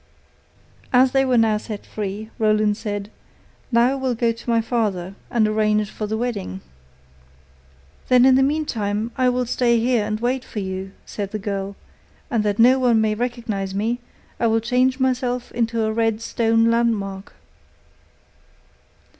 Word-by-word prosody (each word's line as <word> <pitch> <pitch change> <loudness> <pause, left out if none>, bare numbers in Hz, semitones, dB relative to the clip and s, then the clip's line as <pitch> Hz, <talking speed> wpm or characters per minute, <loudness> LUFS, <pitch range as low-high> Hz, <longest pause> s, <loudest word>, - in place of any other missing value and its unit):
As 255 0 +5
they 270 0 +3
were 255 -2 +2
now 220 -2 +3
set 210 -1 -7
free, 210 +1 -5
Roland 215 -1 +2
said: 205 -1 -5 0.6
'Now 235 +2 +4
I - - 0
will 265 -2 -1
go 230 0 +1
to 230 +1 -8
my 230 -1 +3
father 210 -6 -1 0.2
and 225 -3 +2
arrange 215 -1 +1
for 210 - -4
the 220 +1 -2
wedding.' 205 - -3 1.5
'Then 250 0 +5
in 265 - +6
the 265 - +4
meantime 230 -7 -1
I 255 -1 +3
will 250 0 0
stay 235 -1 +2
here 235 -1 +2
and 215 0 -2
wait 250 +2 -1
for - - -12
you,' 190 -1 -4
said 200 -2 -5
the 215 - -4
girl, 200 -1 -4 0.6
'and 230 -4 +1
that 205 -1 0
no 250 +3 +6
one 240 -3 +3
may 220 -1 +2
recognize 220 -5 -3
me, 225 +4 -1 0.4
I 235 - +2
will 225 0 +3
change 250 +3 +1
myself 250 -1 -1
into 230 -1 0
a 220 0 0
red 225 -1 +1
stone 230 0 +2
landmark. 210 -5 -1
225 Hz, 160 wpm, -22 LUFS, 210-245 Hz, 1.5 s, in